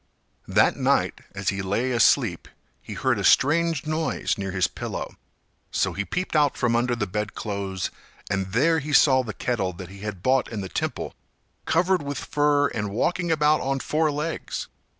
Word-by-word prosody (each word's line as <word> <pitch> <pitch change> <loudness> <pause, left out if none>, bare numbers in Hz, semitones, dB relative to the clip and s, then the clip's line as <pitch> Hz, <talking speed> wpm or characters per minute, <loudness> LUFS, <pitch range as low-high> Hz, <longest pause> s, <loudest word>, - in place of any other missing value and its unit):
That - - +3
night, - - +1
as 95 -1 -1
he 100 -1 -2
lay 105 +7 -1
asleep, 120 -2 +3 0.3
he - - -8
heard - - +1
a - - -2
strange 160 +1 +3
noise 155 +1 -1
near 95 -1 -4
his 95 -1 +1
pillow; - - -6 0.5
so - - 0
he 100 - -3
peeped 180 - -3
out 145 -2 +3
from 120 -1 +1
under 120 +1 +1
the 115 -3 -1
bedclothes 100 -1 -3 0.4
and 95 -1 -2
there 160 +7 +3
he 150 +1 -5
saw 130 -2 +6
the 120 -4 -5
kettle 105 -6 -2
that 90 +1 -9
he 100 +1 -11
had 100 -3 -6
bought 130 -1 +2
in 110 -3 -3
the 95 - -6
temple - - -3 0.5
covered 180 +2 +2
with 145 0 -4
fur 145 -1 +2
and 105 -2 -3
walking 170 - 0
about 150 -1 +3
on 135 +1 -1
four 155 +3 +1
legs. 150 +3 -3
125 Hz, 175 wpm, -25 LUFS, 100-150 Hz, 0.5 s, saw